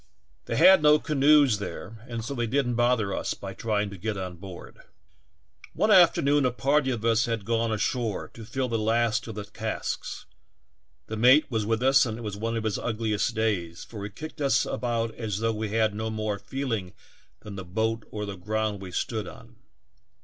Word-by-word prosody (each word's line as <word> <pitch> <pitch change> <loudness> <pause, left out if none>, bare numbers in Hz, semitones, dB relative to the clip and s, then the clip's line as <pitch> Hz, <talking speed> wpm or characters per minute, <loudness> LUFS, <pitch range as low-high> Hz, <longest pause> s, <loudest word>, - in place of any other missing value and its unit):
They - - -3
had 185 +1 +7
no 150 0 +6
canoes 145 -5 +4
there 110 +2 -7
and 115 -2 -4
so 140 - -4
they 120 -3 -1
didn't 125 0 0
bother 120 -4 +2
us - - -2
by 95 -1 -7
trying 105 -1 -1
to 100 - -8
get 105 +1 -3
on 90 -2 -5
board. 90 0 -11 0.9
"One 215 - +2
afternoon 155 -6 +5
a 130 - +3
party 135 +3 +1
of 115 -3 -2
us 115 0 +3
had 115 -4 -3
gone 115 0 0
ashore 110 0 -1
to 115 - -10
fill 130 +4 -2
the 115 -2 -1
last 110 +1 +1
of 110 - -6
the 105 -1 -5
casks; - - -4 0.8
the 110 - -5
mate 130 +6 +5
was 110 -3 -1
with 115 +2 0
us 135 +1 +6
and 110 -1 -4
it - - -8
was 105 -3 -4
one 115 +2 -2
of 110 - -3
his 110 -2 -1
ugliest 110 -2 -1
days, 95 -7 -1
for 105 -3 -8
he 100 - -4
kicked 155 +9 -9
us 135 -5 +3
about 115 -2 -2
as 110 -5 -3
though 115 +1 0
we 110 0 -3
had 110 0 +1
no 110 +1 -3
more 110 -2 -2
feeling 115 -8 -4 0.5
than 105 -1 -9
the 95 - -6
boat 110 +5 -1
or 105 -1 -4
the 100 -1 -5
ground 105 +2 -2
we 95 -2 -8
stood 110 +2 -2
on. - - -13
110 Hz, 200 wpm, -27 LUFS, 105-125 Hz, 0.9 s, had